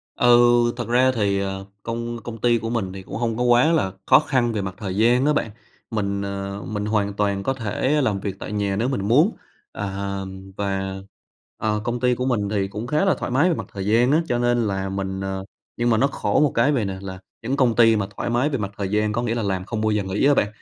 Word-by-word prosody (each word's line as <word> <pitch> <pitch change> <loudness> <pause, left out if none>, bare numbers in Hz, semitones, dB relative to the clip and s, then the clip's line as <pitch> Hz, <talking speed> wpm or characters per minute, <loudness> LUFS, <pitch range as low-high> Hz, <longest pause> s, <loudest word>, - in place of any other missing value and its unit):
Ừ, 120 0 +6 0.3
thật 120 - -4
ra 125 +2 +4
thì, 100 -4 0
ờ, 95 0 -4 0.2
công 115 +1 -4
công 115 -1 -6
ty 120 -1 +3
của 115 +1 -4
mình 100 -6 -2
thì 95 -1 -8
cũng - - -8
hông 115 -1 -1
có 125 - 0
quá 125 +6 +4
là 95 - +1
khó - - +7
khăn 130 -6 0
về 105 - -1
mặt 95 -1 -4
thời 95 -3 -4
gian 120 +5 +3
á 150 - +3
bạn, 110 -7 -1 0.4
mình, 100 -2 -1
ờ, 100 0 -4
mình 105 -1 -3
hoàn 105 -2 0
toàn 100 -1 -1
có 135 - 0
thể 130 +5 0
làm 105 -6 0
việc 100 -1 -4
tại - - -6
nhà 100 -2 -1
nếu 115 +5 0
mình 105 -7 -2
muốn, 150 - +4 0.4
À, 100 -1 -3 0.4
và, 95 -1 -2 0.6
ờ, 105 -1 -1
công 120 0 -2
ty 125 0 +2
của 125 - -2
mình 105 -6 0
thì 100 -2 0
cũng 105 +4 -6
khá 150 +8 +1
là 190 - +3
thoải - - -3
mái 145 +8 +3
về 165 - +1
mặt - - -5
thời 100 -1 -4
gian 120 +5 +3
á, 160 +3 +4
cho 120 -1 0
nên 120 -2 +2
là 95 -1 -2
mình 95 0 -3
ờ, 95 0 -4 0.3
nhưng 120 0 +1
mà 110 - +3
nó 135 +4 +3
khổ 140 - 0
một 150 - +3
cái 120 +6 +3
vầy 120 -7 0
nè, 95 -1 -4
là 95 -1 -7 0.2
những 135 +4 -1
công 120 -4 +3
ty 115 -1 +6
mà 100 -2 -1
thoải - - -2
mái 120 +5 +1
về 135 - -1
mặt 100 -2 -4
thời 100 -2 -2
gian 105 0 +1
có 120 - 0
nghĩa 115 0 -1
là 115 - -1
làm 95 -2 -2
không 110 +1 -3
bao 110 0 +1
giờ 105 -2 0
nghỉ 95 +7 0
á 145 - +6
bạn. 105 - +2
110 Hz, 260 wpm, -22 LUFS, 100-120 Hz, 0.6 s, khó